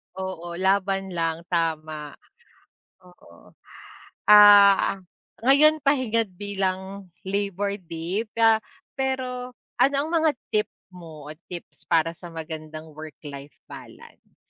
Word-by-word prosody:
Oo, 185 -2 -6
laban 195 +1 0
lang, 165 -1 -2
tama, 155 -3 -2 0.9
oo. 180 - -19 0.8
Ah, 205 -2 +7 0.4
ngayon 300 +5 +5
pahingat 250 -6 +1
bilang 195 -1 -4 0.2
Labor 200 0 -2
Day, 175 +6 -4
ah, 225 -1 +5 0.3
pero 255 -2 -3 0.2
ano 275 +1 +4
ang 295 +3 -1
mga 320 -2 +3 0.2
tip 210 0 +1 0.2
mo 165 -5 -12
at 155 - -20
tips 175 -1 -10
para 165 -1 +2
sa 175 +1 -12
magandang 160 -1 -8
work 155 0 -10
life 140 0 -10
balance? - - -14
190 Hz, 110 wpm, -24 LUFS, 165-215 Hz, 0.9 s, Ah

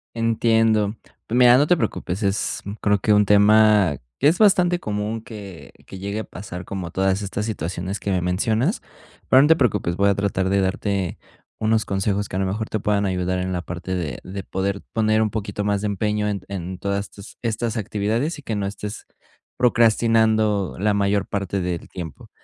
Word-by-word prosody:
Entiendo. 115 -2 +2 0.3
Mira, 125 +1 +6
no 145 - +4
te 180 - +4
preocupes. 95 - -3
Es, 100 +1 -1 0.2
creo, 105 -1 +2
que 105 +2 +2
un 105 0 +4
tema 105 -4 +5 0.2
que 140 - +4
es 165 +4 +3
bastante 180 -4 +4
común 105 0 -3
que 100 -6 -10 0.2
que 95 - -9
llegue 100 +3 -4
a - - -3
pasar, 90 -2 -8
como 90 -4 -5
todas 95 +1 0
estas 100 +2 -3
situaciones 95 0 -4
que 100 - -3
me 90 -2 +1
mencionas. 110 - 0 0.5
Pero 130 - +7
no 145 - +5
te 160 - +6
preocupes, 110 - 0
voy 100 +1 +3
a 100 - +2
tratar 95 -2 0
de 100 0 +2
darte 95 -1 -1 0.4
unos 110 0 +1
consejos 100 +1 -1
que - - -6
a - - 0
lo 95 - +1
mejor 110 +4 -3
te 110 - -1
puedan 100 0 +1
ayudar 90 0 -1
en 95 0 -2
la 90 - -2
parte 90 +1 -5
de 85 -5 -3
de 95 0 -6
poder 100 +2 -2
poner 110 -1 +2
un 105 - -1
poquito 105 -1 -3
más 100 -1 0
de 105 - -1
empeño 105 +1 -1
en 100 -3 -3
en 95 -1 -5
todas 100 +1 -2
estas 100 +1 -13
estas 115 -1 -2
actividades 110 - -1
y 145 - -12
que 110 - -3
no 100 -1 -1
estés 105 +1 -7 0.5
procrastinando 110 -4 +3
la 105 +1 +2
mayor 100 0 +1
parte 100 -1 -2
del 90 -2 -3
tiempo. 85 -6 -8
100 Hz, 195 wpm, -22 LUFS, 95-110 Hz, 0.5 s, Pero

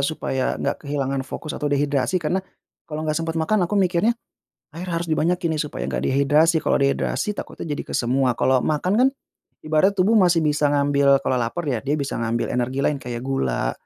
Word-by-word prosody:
supaya 140 -2 -1
enggak - - -2
kehilangan 140 -2 -2
fokus 140 +3 -6
atau 145 - -2
dehidrasi, 145 +2 +1
karena 175 +3 0 0.5
kalau 155 0 -4
enggak 155 +1 -1
sempat 165 0 -3
makan 175 +3 +1
aku 210 - -1
mikirnya, 195 +5 +2 0.6
air 180 - -5
harus 170 -1 -3
dibanyakin 165 +1 0
nih - - +1
supaya - - -5
enggak - - -2
dehidrasi. 150 +4 +3
Kalau - - +2
dehidrasi 140 +8 0
takutnya - - -7
jadi - - -4
ke - - -5
semua. 125 0 +1
Kalau 130 -1 +3
makan 155 +5 0
kan 250 +4 +5 0.6
ibarat 175 +6 +2
tubuh 195 +5 +3
masih 175 -6 +4
bisa 150 -1 +2
ngambil 140 -1 +3
kalau 130 - +1
lapar 120 +10 -3
ya 125 -6 -1
dia 140 +2 0
bisa 140 -1 -3
ngambil 115 +1 -1
energi 125 +2 -1
lain 145 -2 +1
kayak 120 0 -5
gula 135 - -1
150 Hz, 190 wpm, -22 LUFS, 135-170 Hz, 0.6 s, kan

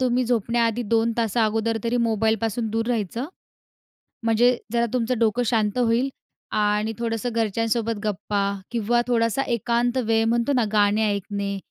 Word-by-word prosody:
तुम्ही 250 0 +2
झोपण्याआधी 235 0 0
2 230 0 +3
तास 225 -1 -1
अगोदर 225 0 +1
तरी 235 +1 0
मोबाईलपासून 225 0 0
दूर 225 +1 -1
राहायचं, 230 +1 -2 1.0
म्हणजे 235 +2 +3 0.2
जरा 235 0 +2
तुमचं 250 0 0
डोकं 230 +1 +2
शांत 215 -2 +1
होईल. 245 +2 +2 0.4
आणि 210 +1 +1
थोडंसं 230 0 -2
घरच्यांसोबत 230 +1 0
गप्पा 210 0 -2 0.3
किंवा 240 +1 +1
थोडासा 230 +1 +1
एकांत 240 +1 0
वेळ 225 0 +2
म्हणतो 235 +4 +1
ना, 245 - +2
गाणे 210 0 +3
ऐकणे, 200 0 -3
230 Hz, 140 wpm, -23 LUFS, 215-240 Hz, 1.0 s, 2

